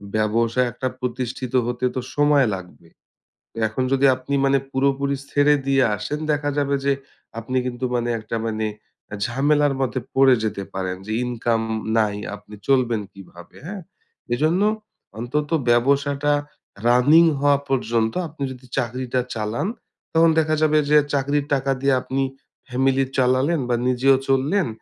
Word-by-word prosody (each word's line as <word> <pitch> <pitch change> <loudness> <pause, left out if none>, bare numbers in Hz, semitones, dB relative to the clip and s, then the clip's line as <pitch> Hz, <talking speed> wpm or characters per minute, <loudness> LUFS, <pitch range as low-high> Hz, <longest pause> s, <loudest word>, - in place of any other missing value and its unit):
ব্যবসা 115 +3 +1
একটা 130 - -3
প্রতিষ্ঠিত 125 0 -4
হতে 125 +1 -2
তো 130 - -1
সময় 145 -3 +4
লাগবে। 90 -2 -12 0.7
তো - - -17
এখন 110 +4 -2
যদি 135 +1 +3
আপনি 130 +2 -6
মানে 135 0 +3
পুরোপুরি 140 +1 +1 0.2
ছেড়ে 145 +1 +4
দিয়ে 135 -1 +4
আসেন 150 - -4
দেখা 145 -1 0
যাবে 140 -1 +1
যে 140 - +3 0.5
আপনি 130 +3 -3
কিন্তু 125 0 -3
মানে 120 0 -1
একটা 110 +1 -5
মানে 110 -1 -1 0.4
অ্যা - - -7
ঝামেলার 145 +3 +2
মধ্যে 130 0 -1 0.2
পড়ে 135 -1 +6
যেতে 105 -2 -2
পারেন। 95 -1 -3
যে 110 - -4
ইনকাম 115 -2 0 0.4
নাই, 105 -2 +1 0.2
আপনি 105 +1 -13
চলবেন 125 -5 +2
কিভাবে, 90 -3 -14
হ্যাঁ? 195 +2 -6 0.5
এইজন্য 155 +8 +1 0.6
অন্তত 145 +5 -2 0.2
ব্যবসাটা 140 +4 +2 0.5
running 145 +8 +6
হওয়া 145 0 +4
পর্যন্ত 115 -4 0
আপনি 150 -2 -7
যদি 130 0 -11
চাকরিটা 125 0 -1
চালান, 110 - -2 0.5
তখন 165 0 +5
দেখা 155 0 +1
যাবে 155 0 +3
যে 150 - +7 0.2
চাকরির 140 +1 0
টাকা 135 0 -1
দিয়ে 140 0 +3
আপনি 135 +1 -1 0.5
family 135 +2 +2
চালালেন 130 +5 +2
বা 120 - +2
নিজেও 130 +2 +4
চললেন। 145 +9 +2
130 Hz, 145 wpm, -22 LUFS, 120-140 Hz, 0.7 s, যে